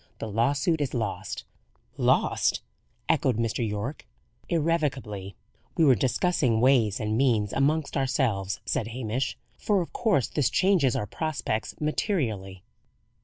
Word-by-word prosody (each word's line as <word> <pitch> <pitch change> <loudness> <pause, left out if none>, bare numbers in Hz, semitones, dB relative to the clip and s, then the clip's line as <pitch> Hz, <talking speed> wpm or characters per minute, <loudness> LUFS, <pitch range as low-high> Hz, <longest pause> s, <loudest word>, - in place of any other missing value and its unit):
"The 110 - -5
lawsuit 140 - +1
is 135 -2 -2
lost." 110 -4 -3 0.5
"Lost!" - - +2 0.4
echoed 125 -4 +2
Mr. 115 -1 -1
Yorke. 110 +6 -4 0.4
"Irrevocably. 135 - -1 0.4
We 165 - +5
were 135 - +7
discussing 125 - +1
ways 120 -5 +3
and 110 0 -1
means 115 -5 +2
amongst 145 +2 +1
ourselves," 120 -9 0
said 115 +1 -1
Hamish, 120 +1 -3 0.2
"for 205 -2 +2
of 175 - -4
course 200 - +2
this 145 -5 +1
changes 180 - +3
our 105 - -1
prospects 140 -2 -3
materially." 115 - -2
130 Hz, 120 wpm, -27 LUFS, 110-150 Hz, 0.5 s, were